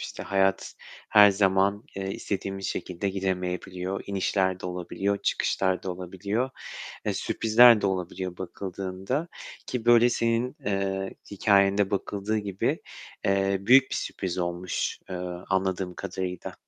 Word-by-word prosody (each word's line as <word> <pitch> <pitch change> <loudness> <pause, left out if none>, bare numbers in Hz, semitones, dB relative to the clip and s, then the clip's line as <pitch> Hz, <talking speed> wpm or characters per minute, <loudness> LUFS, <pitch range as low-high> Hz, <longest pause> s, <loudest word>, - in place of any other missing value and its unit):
İşte, - - -6
hayat 95 -1 +1 0.3
her 105 -1 +8
zaman, 100 +2 +2
eee, 95 0 -3
istediğimiz 95 0 -4
şekilde 90 +2 -3
gidemeyebiliyor. 95 0 -3
İnişler 95 -1 0
de - - -5
olabiliyor, 90 +3 -2
çıkışlar 95 -1 0
da 95 - -3
olabiliyor. 100 +7 -3 0.5
E, - - 0
sürprizler 115 0 +5
de - - +1
olabiliyor 90 -1 -3
bakıldığında, 95 - -4 0.4
ki 125 -3 -3
böyle 120 0 +6
senin, 115 +2 0
eee, 95 -1 -1 0.2
hikâyende 100 0 +3
bakıldığı 100 +2 -1
gibi, 100 -2 -1 0.4
eee, 100 0 +2
büyük 130 +7 +6
bir - - -1
sürpriz 95 -2 -4
olmuş, 85 +1 -2
eee, 90 - -3 0.3
anladığım 95 -1 0
kadarıyla. 90 -2 -5
95 Hz, 120 wpm, -27 LUFS, 95-100 Hz, 0.5 s, her